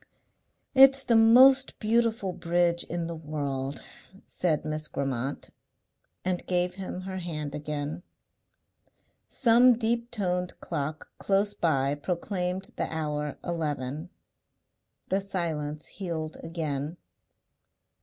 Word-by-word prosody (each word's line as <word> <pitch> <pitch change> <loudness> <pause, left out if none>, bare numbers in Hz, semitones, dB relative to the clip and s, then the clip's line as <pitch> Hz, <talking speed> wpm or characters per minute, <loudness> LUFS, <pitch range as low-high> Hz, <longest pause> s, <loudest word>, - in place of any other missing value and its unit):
"It's 270 0 +7
the 240 -3 +3
most 255 +4 +7
beautiful 225 -3 +1
bridge 170 0 +1
in 170 0 -3
the 170 0 -4
world," 145 -3 -4 0.4
said 155 -4 -1
Miss 155 0 -3
Grammont, 135 -1 -3 0.7
and 185 -1 0
gave 180 0 +1
him 185 -1 -6
her 190 0 -5
hand 150 -5 -4
again. 150 +1 -4 1.3
Some 240 0 +5
deep 235 +1 0
toned 180 -5 -2
clock 150 +2 -4
close 200 +1 +1
by 140 -4 +1
proclaimed 180 +4 -3
the - - -2
hour 150 -2 -3
eleven. 155 -2 -3 1.0
The 195 +1 +1
silence 155 -6 -3
healed 165 -5 -5
again. 155 -1 -3
170 Hz, 105 wpm, -28 LUFS, 150-195 Hz, 1.3 s, It's